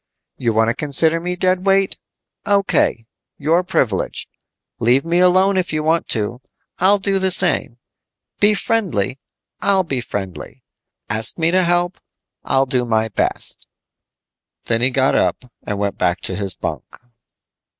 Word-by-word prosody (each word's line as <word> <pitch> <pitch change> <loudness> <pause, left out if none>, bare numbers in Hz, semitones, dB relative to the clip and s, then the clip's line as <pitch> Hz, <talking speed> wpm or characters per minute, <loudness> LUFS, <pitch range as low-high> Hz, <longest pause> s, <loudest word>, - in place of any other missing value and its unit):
You 120 -3 0
want 110 +1 +2
to - - -2
consider 160 +4 +3
me 180 +1 -3
dead 185 0 +1
weight? 195 0 +2 0.5
O.K., 200 - +1 0.3
your 160 +5 +2
privilege. 120 - -2 0.5
Leave 125 +6 +2
me 170 +1 +1
alone 185 +2 +4
if 180 -1 -1
you 155 0 -2
want 160 +2 +1
to, 115 +3 -2 0.4
I'll 195 +3 +4
do 195 0 -1
the 190 0 +1
same. 175 -9 +1 0.6
Be 210 +1 +4
friendly, 150 - -1 0.4
I'll 195 -1 +2
be 135 -7 -3
friendly. 95 -8 -7 0.4
Ask 110 +1 +2
me 165 0 +1
to 185 +1 +3
help. 175 +1 0 0.4
I'll 135 0 +1
do 125 -2 0
my 110 -2 0
best." - - -3 1.0
Then 115 0 0
he 125 - +5
got 135 0 +1
up - - 0 0.2
and 105 - -4
went 100 -1 -3
back 90 0 0
to 95 - -3
his 100 -2 -2
bunk. - - -4
155 Hz, 150 wpm, -19 LUFS, 115-185 Hz, 1.0 s, he